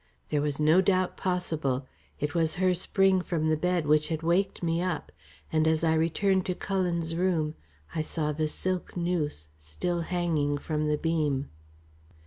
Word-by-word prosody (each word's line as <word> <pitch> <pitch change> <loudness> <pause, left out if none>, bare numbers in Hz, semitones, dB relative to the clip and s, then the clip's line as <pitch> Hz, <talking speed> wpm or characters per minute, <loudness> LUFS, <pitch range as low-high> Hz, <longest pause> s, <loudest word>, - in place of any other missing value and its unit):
There 150 - +1
was 145 -1 -1
no 155 +4 +5
doubt 185 -1 +1
possible. 160 -8 -1 0.3
It 145 0 -2
was 165 -2 +1
her 185 0 +3
spring 190 +1 +2
from 160 -3 -1
the 155 - +3
bed 180 +1 0
which 150 0 +3
had 160 -1 -3
waked 175 +3 +1
me 165 0 +1
up, 180 0 -2 0.4
and 155 0 +3
as 160 0 +2
I 160 -1 +3
returned 185 +4 +2
to 180 - -1
Cullen's 175 -4 -1
room, 165 -3 +1 0.4
I 155 - 0
saw 155 -1 -2
the 155 +1 -1
silk 185 +4 -2
noose 160 - -1
still 125 - -2
hanging 160 -4 0
from 150 +1 -2
the 150 0 +1
beam. 150 -4 0
165 Hz, 165 wpm, -28 LUFS, 150-180 Hz, 0.4 s, no